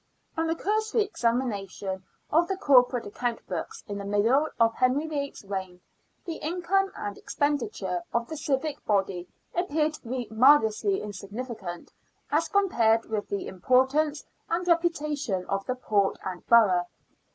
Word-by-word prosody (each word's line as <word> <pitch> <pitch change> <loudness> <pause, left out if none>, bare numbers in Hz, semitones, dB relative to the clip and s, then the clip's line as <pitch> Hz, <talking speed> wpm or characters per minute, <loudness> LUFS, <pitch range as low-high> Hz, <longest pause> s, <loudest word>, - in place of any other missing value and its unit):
On 325 0 0
a 325 - +1
cursory 435 +4 +1
examination 210 - -2 0.3
of 335 +3 +4
the 385 - -2
corporate 250 -6 +4
account 235 +3 -3
books 445 0 -5
in 200 -1 -4
the - - -5
middle 225 +9 +3
of 230 0 +4
Henry 255 +6 +2
VIII. 285 -3 -3
's - - -12
reign, 190 -2 -5 0.5
the 330 -3 -4
income 365 +4 0
and 205 -1 -5
expenditure 295 +5 -1
of 235 0 0
the 315 - -5
civic 285 0 -2
body 195 -3 0 0.3
appear 310 -3 +1
to 310 - -11
be 245 -1 -4
marvellously 255 - +4
insignificant 205 -2 -7 0.4
as 315 +3 +2
compared 235 - +3
with 210 -2 -2
the 200 - -2
importance 265 - +2 0.2
and 345 +2 0
reputa 335 -3 +1
tion 190 -9 -2
of 195 0 -2
the 255 - 0
port 205 -5 +1
and 185 -2 -5
borough. 190 -7 +5
255 Hz, 150 wpm, -27 LUFS, 205-315 Hz, 0.5 s, borough